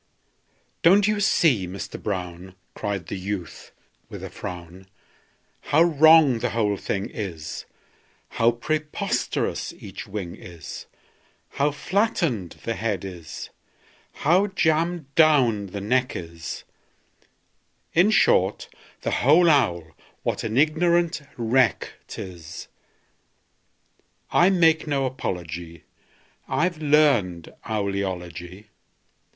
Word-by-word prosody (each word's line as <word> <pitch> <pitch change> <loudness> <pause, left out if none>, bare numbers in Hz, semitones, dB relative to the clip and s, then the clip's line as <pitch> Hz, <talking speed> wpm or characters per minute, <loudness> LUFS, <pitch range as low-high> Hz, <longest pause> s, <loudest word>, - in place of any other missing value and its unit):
"Don't 195 +4 +5
you 210 -1 +1
see, 140 - +3
Mister 95 +2 -7
Brown," 90 -2 -5 0.2
Cried 100 -4 -3
the - - -5
youth, 95 -3 -6 0.4
with - - -8
a - - -7
frown, 90 +1 -8 0.8
"How 160 +3 +4
wrong 155 -5 +6
the - - -1
whole 105 -3 0
thing 100 +1 -3
is, 85 -9 -6 0.6
How 115 - +3
preposterous 150 +6 -2
each 100 +1 -9
wing 95 -4 -5
is, 85 -4 -10 0.6
How 145 +2 +1
flattened 150 - -1
the 115 - -1
head 105 -4 -2
is, 90 -4 -8 0.7
how 180 +7 +4
jammed 165 -4 0
down 130 -11 +4
the 100 +2 -6
neck 125 +5 +1
is 85 -1 -7 1.3
In 180 +5 +5
short, 105 - +3 0.3
the - - -2
whole 160 +6 +5
owl, 85 - +1 0.3
what - - -2
an 110 +1 -2
ignorant 170 +2 +2 0.2
wreck 120 0 +1
't - - -8
is! 85 -3 -8 1.6
I 175 - +5
make 165 -4 +3
no 140 -2 0
apology; 85 - -5 0.6
I've 170 0 0
learned 140 - +2
owl 105 -3 -1
eology. 90 0 -5
115 Hz, 105 wpm, -24 LUFS, -, 1.6 s, wrong